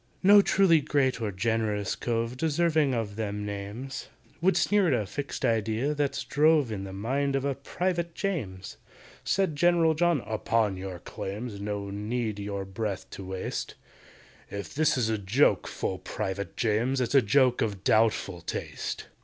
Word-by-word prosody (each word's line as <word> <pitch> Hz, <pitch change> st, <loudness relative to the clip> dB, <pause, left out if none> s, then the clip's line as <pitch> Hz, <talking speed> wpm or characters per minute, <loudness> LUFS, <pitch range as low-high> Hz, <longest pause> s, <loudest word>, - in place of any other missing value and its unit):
"No 205 Hz, +2 st, +8 dB
truly 190 Hz, -5 st, +4 dB
great 135 Hz, -4 st, +1 dB
or 105 Hz, -2 st, -1 dB
generous 105 Hz, 0 st, -1 dB
cove 115 Hz, 0 st, -2 dB
Deserving 155 Hz, -1 st, +2 dB
of 110 Hz, -3 st, -3 dB
them 105 Hz, -1 st, -3 dB
names, 105 Hz, +6 st, -6 dB, 0.3 s
Would 190 Hz, +3 st, +3 dB
sneer 205 Hz, -3 st, +3 dB
at 125 Hz, -, +3 dB
a 105 Hz, -, -2 dB
fixed 140 Hz, +8 st, -4 dB
idea 115 Hz, +5 st, +1 dB
that's 145 Hz, -2 st, -1 dB
drove 150 Hz, -4 st, +3 dB
In 100 Hz, -2 st, -4 dB
the 95 Hz, -, -7 dB
mind 135 Hz, +8 st, -1 dB
of 135 Hz, 0 st, 0 dB
a 140 Hz, -, +1 dB
PRIVATE 170 Hz, +5 st, -2 dB
JAMES!" 105 Hz, -, -4 dB, 0.5 s
Said 190 Hz, -5 st, +1 dB
GENERAL 170 Hz, 0 st, +4 dB
JOHN, 170 Hz, -2 st, +2 dB
"Upon 110 Hz, -1 st, 0 dB
your 95 Hz, -1 st, -6 dB
claims 100 Hz, +5 st, -6 dB
No 100 Hz, -1 st, -3 dB
need 105 Hz, +1 st, -2 dB
your 100 Hz, -1 st, -4 dB
breath 95 Hz, 0 st, -4 dB
to 95 Hz, -, -7 dB
waste; 95 Hz, 0 st, -4 dB, 0.7 s
If 100 Hz, 0 st, -6 dB
this 155 Hz, -2 st, +2 dB
is 120 Hz, -3 st, +1 dB
a 110 Hz, -1 st, 0 dB
joke, 105 Hz, +9 st, +2 dB
FULL 95 Hz, -, -3 dB
PRIVATE 95 Hz, -1 st, -4 dB
JAMES, 120 Hz, +4 st, +1 dB
It's 125 Hz, -1 st, -1 dB
a 135 Hz, -, +7 dB
joke 125 Hz, +3 st, +3 dB
of 100 Hz, -4 st, -2 dB
doubtful 110 Hz, -5 st, +2 dB
taste. -, -, -4 dB
115 Hz, 160 wpm, -28 LUFS, 100-145 Hz, 0.7 s, No